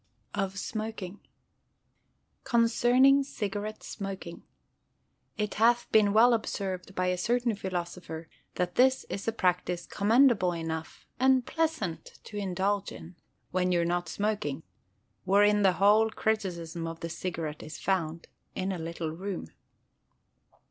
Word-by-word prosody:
Of 195 Hz, -1 st, -2 dB
Smoking 215 Hz, -2 st, -5 dB, 1.2 s
Concerning 245 Hz, +4 st, +4 dB
Cigarette 210 Hz, -4 st, -4 dB
Smoking: 195 Hz, -4 st, -6 dB, 1.0 s
It 210 Hz, -1 st, -1 dB
hath 240 Hz, +1 st, +4 dB
been 210 Hz, -2 st, +5 dB
well 235 Hz, +4 st, +6 dB
observed 195 Hz, -4 st, -3 dB
by 185 Hz, -, 0 dB
a 180 Hz, -, 0 dB
certain 240 Hz, +3 st, +1 dB
philosopher 175 Hz, -4 st, -5 dB, 0.3 s
that 180 Hz, -1 st, -1 dB
this 260 Hz, +1 st, +4 dB
is 200 Hz, -, -4 dB
a -, -, +3 dB
practice 180 Hz, -4 st, 0 dB
commendable 215 Hz, -3 st, +3 dB
enough, 160 Hz, -1 st, -5 dB
and 260 Hz, -1 st, +4 dB
pleasant 315 Hz, -, -2 dB
to 210 Hz, -, -11 dB
indulge 195 Hz, +1 st, -1 dB
in, 175 Hz, +2 st, -10 dB, 0.4 s
"when 180 Hz, 0 st, +1 dB
you're 170 Hz, -1 st, +2 dB
not 175 Hz, -1 st, -1 dB
smoking"; 205 Hz, -8 st, -2 dB, 0.6 s
wherein 205 Hz, +2 st, +4 dB
the 190 Hz, -2 st, +5 dB
whole 210 Hz, +4 st, +4 dB
criticism 175 Hz, -7 st, -2 dB
of 165 Hz, 0 st, -7 dB
the 165 Hz, -, -3 dB
cigarette 160 Hz, -3 st, -4 dB
is 155 Hz, -, -8 dB
found, 170 Hz, -4 st, -1 dB, 0.3 s
in 190 Hz, +1 st, -1 dB
a 185 Hz, -, -3 dB
little 165 Hz, -1 st, -4 dB
room. 180 Hz, -, -5 dB
195 Hz, 125 wpm, -29 LUFS, 175-220 Hz, 1.2 s, well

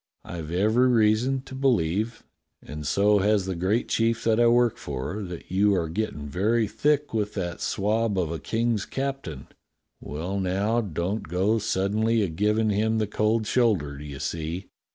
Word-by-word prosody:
I've 85 Hz, -3 st, -6 dB
every 110 Hz, +8 st, +3 dB
reason 120 Hz, +3 st, +3 dB
to 135 Hz, -, -12 dB
be 135 Hz, +1 st, 0 dB
lieve, 110 Hz, +1 st, 0 dB, 0.4 s
and 75 Hz, -1 st, -6 dB
so 105 Hz, +5 st, +3 dB
has 100 Hz, -1 st, +2 dB
the 95 Hz, -, -2 dB
great 95 Hz, +7 st, 0 dB
chief 115 Hz, 0 st, +1 dB
that 115 Hz, 0 st, +2 dB
I 120 Hz, -, +5 dB
work 120 Hz, -1 st, +3 dB
for, 70 Hz, +9 st, -5 dB
that 90 Hz, -3 st, -8 dB
you 100 Hz, +2 st, +3 dB
are 85 Hz, -3 st, -1 dB
gettin' 80 Hz, -6 st, -3 dB
very 110 Hz, +9 st, +1 dB
thick 145 Hz, +7 st, 0 dB
with 105 Hz, -2 st, -1 dB
that 90 Hz, -4 st, -4 dB
swab 105 Hz, +1 st, 0 dB
of 85 Hz, -3 st, 0 dB
a 85 Hz, -, -4 dB
King's 115 Hz, -2 st, -1 dB
captain. 135 Hz, -, -4 dB, 0.5 s
Well, 90 Hz, +7 st, -4 dB
now, 100 Hz, +5 st, +1 dB
don't 95 Hz, +1 st, -2 dB
go 95 Hz, +7 st, +1 dB
suddenly 110 Hz, +2 st, +1 dB
a 95 Hz, -, -1 dB
givin' 105 Hz, +6 st, +1 dB
him 110 Hz, +2 st, +1 dB
the 110 Hz, -, +1 dB
cold 110 Hz, +2 st, 0 dB
shoulder, 105 Hz, -, +1 dB
do -, -, -8 dB
you 70 Hz, -2 st, -7 dB
see? 85 Hz, +5 st, -4 dB
105 Hz, 175 wpm, -26 LUFS, 90-115 Hz, 0.5 s, I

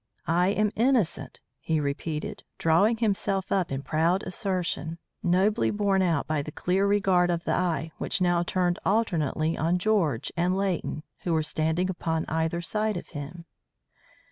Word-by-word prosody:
"I 175 Hz, +2 st, +2 dB
am 210 Hz, +1 st, +1 dB
innocent," 235 Hz, -6 st, +1 dB, 0.2 s
he 160 Hz, -1 st, 0 dB
repeated, 150 Hz, +2 st, -3 dB
drawing 195 Hz, +8 st, +3 dB
himself 200 Hz, -3 st, 0 dB
up 190 Hz, -6 st, +1 dB
in 135 Hz, 0 st, -3 dB
proud 165 Hz, +6 st, +1 dB
assertion, 185 Hz, -4 st, -2 dB, 0.2 s
nobly 190 Hz, +6 st, +2 dB
borne 200 Hz, -2 st, +1 dB
out 170 Hz, -6 st, +1 dB
by 155 Hz, -2 st, 0 dB
the 155 Hz, -, -7 dB
clear 190 Hz, +5 st, +1 dB
regard 190 Hz, -3 st, +3 dB
of 170 Hz, -1 st, -1 dB
the -, -, -1 dB
eye 165 Hz, -3 st, 0 dB
which 220 Hz, -, -1 dB
now 175 Hz, -1 st, +2 dB
turned 175 Hz, 0 st, 0 dB
alternately 165 Hz, -6 st, +1 dB
on 170 Hz, +3 st, +1 dB
George 175 Hz, -, +1 dB
and 180 Hz, +2 st, +1 dB
Leighton, 185 Hz, -5 st, -2 dB, 0.2 s
who 175 Hz, -, -1 dB
were 160 Hz, -1 st, +2 dB
standing 160 Hz, +4 st, 0 dB
upon 165 Hz, -3 st, -2 dB
either 160 Hz, +1 st, 0 dB
side 215 Hz, +4 st, -1 dB
of -, -, -8 dB
him. 165 Hz, +3 st, -7 dB
175 Hz, 155 wpm, -27 LUFS, 160-195 Hz, 0.2 s, drawing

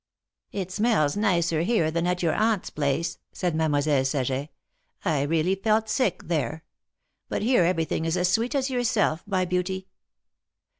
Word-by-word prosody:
" -, -, -64 dB
It 190 Hz, -2 st, -4 dB
smells 205 Hz, -8 st, +2 dB
nicer 170 Hz, -6 st, +1 dB
here 170 Hz, -4 st, +1 dB
than 170 Hz, +2 st, 0 dB
at 180 Hz, 0 st, -1 dB
your 165 Hz, -, +2 dB
Aunt's 215 Hz, -3 st, 0 dB
place," 145 Hz, +3 st, -1 dB
said 180 Hz, -3 st, -2 dB
Mademoiselle 145 Hz, -3 st, +2 dB
Saget. 135 Hz, +1 st, -1 dB, 0.3 s
" -, -, -46 dB
I 155 Hz, -6 st, +1 dB
really 160 Hz, +5 st, +1 dB
felt 215 Hz, +2 st, +1 dB
sick 215 Hz, -3 st, 0 dB
there. 160 Hz, -1 st, -2 dB, 0.7 s
But -, -, -2 dB
here 240 Hz, -4 st, +4 dB
everything 165 Hz, -2 st, 0 dB
is 165 Hz, +2 st, 0 dB
as 180 Hz, 0 st, +2 dB
sweet 230 Hz, +9 st, +1 dB
as 270 Hz, -1 st, 0 dB
yourself, 230 Hz, -9 st, +1 dB
my 185 Hz, -2 st, +1 dB
beauty 180 Hz, +1 st, -2 dB
180 Hz, 160 wpm, -26 LUFS, 155-210 Hz, 0.7 s, here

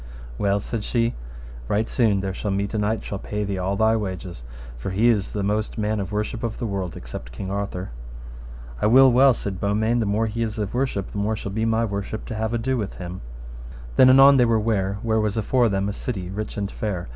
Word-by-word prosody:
Well, 100 Hz, 0 st, +2 dB
said 110 Hz, +1 st, -4 dB
she, 115 Hz, +1 st, 0 dB, 0.5 s
right 110 Hz, -, +1 dB
soon 110 Hz, -6 st, +2 dB
there 95 Hz, -1 st, -3 dB
shall 105 Hz, -, -4 dB
meet 100 Hz, +1 st, -1 dB
a 110 Hz, -, 0 dB
knight 105 Hz, +2 st, 0 dB
shall 100 Hz, -, -5 dB
pay 105 Hz, +1 st, -3 dB
thee 100 Hz, -2 st, -3 dB
all 95 Hz, +2 st, -1 dB
thy 110 Hz, +1 st, +3 dB
wages, 95 Hz, -, -5 dB, 0.3 s
for -, -, -5 dB
he 105 Hz, +6 st, +3 dB
is 105 Hz, -4 st, +1 dB
the 100 Hz, -, -2 dB
most 105 Hz, +3 st, -1 dB
man 105 Hz, 0 st, 0 dB
of 100 Hz, 0 st, -4 dB
worship 105 Hz, +3 st, -2 dB
of 115 Hz, -2 st, -3 dB
the -, -, -3 dB
world, 95 Hz, -4 st, -3 dB
except -, -, -8 dB
King 95 Hz, +10 st, -6 dB
Arthur. 100 Hz, -3 st, -3 dB, 0.9 s
I -, -, +3 dB
will 130 Hz, +3 st, +7 dB
well, 130 Hz, +1 st, +6 dB
said 95 Hz, -3 st, -5 dB
Beaumains, 110 Hz, +4 st, +1 dB
the 110 Hz, -, 0 dB
more 105 Hz, +3 st, +1 dB
he 110 Hz, +1 st, -3 dB
is 110 Hz, -1 st, -2 dB
of 105 Hz, -2 st, -3 dB
worship, 125 Hz, -7 st, -1 dB
the 105 Hz, -, -4 dB
more 105 Hz, +2 st, 0 dB
shall 100 Hz, -2 st, -5 dB
be 110 Hz, +3 st, -1 dB
my 115 Hz, 0 st, +2 dB
worship 100 Hz, 0 st, -4 dB
to 110 Hz, -, -4 dB
have 110 Hz, 0 st, -1 dB
ado 120 Hz, +3 st, 0 dB
with 105 Hz, -4 st, -4 dB
him. 90 Hz, 0 st, -7 dB, 0.7 s
Then 130 Hz, -, +7 dB
anon 135 Hz, +1 st, +8 dB
they 125 Hz, -, +5 dB
were 115 Hz, -1 st, +3 dB
ware 100 Hz, -3 st, 0 dB
where 110 Hz, -1 st, +1 dB
was 105 Hz, 0 st, 0 dB
afore 120 Hz, +2 st, +2 dB
them 100 Hz, 0 st, 0 dB
a 100 Hz, -, -2 dB
city 95 Hz, -6 st, -4 dB
rich 105 Hz, +2 st, -5 dB
and 100 Hz, -1 st, -2 dB
fair. 95 Hz, -, -4 dB
105 Hz, 230 wpm, -23 LUFS, 100-115 Hz, 0.9 s, anon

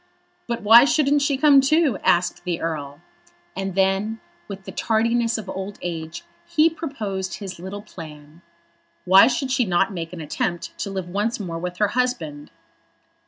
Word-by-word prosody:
"But 235 Hz, -2 st, -3 dB
why 225 Hz, +3 st, +9 dB
shouldn't 290 Hz, -1 st, +2 dB
she 280 Hz, -1 st, +1 dB
come 280 Hz, -1 st, +6 dB
too?" 290 Hz, -, +2 dB
asked 175 Hz, +1 st, +1 dB
the 175 Hz, -2 st, -2 dB
Earl. 145 Hz, -2 st, -5 dB, 0.5 s
And 195 Hz, -1 st, -4 dB
then, 195 Hz, +3 st, +1 dB, 0.3 s
with 195 Hz, -1 st, -8 dB
the -, -, -8 dB
tardiness 230 Hz, +1 st, +1 dB
of 215 Hz, -3 st, -7 dB
old 195 Hz, +1 st, -6 dB
age, 165 Hz, -1 st, -5 dB, 0.2 s
he 320 Hz, +1 st, +3 dB
proposed 210 Hz, -, -4 dB
his 190 Hz, -4 st, -8 dB
little 195 Hz, +3 st, -7 dB
plan. 155 Hz, -4 st, -12 dB, 0.6 s
"Why 190 Hz, +4 st, +7 dB
should 260 Hz, +1 st, -1 dB
she 255 Hz, -, +2 dB
not 195 Hz, -1 st, +1 dB
make 165 Hz, -2 st, -5 dB
an 180 Hz, -, -8 dB
attempt 165 Hz, +2 st, -3 dB
to -, -, -3 dB
live 190 Hz, -2 st, -4 dB
once 205 Hz, +6 st, -2 dB
more 170 Hz, -5 st, -5 dB
with 180 Hz, +1 st, -5 dB
her 210 Hz, 0 st, +2 dB
husband?" 175 Hz, -12 st, -2 dB
195 Hz, 165 wpm, -22 LUFS, 175-240 Hz, 0.6 s, why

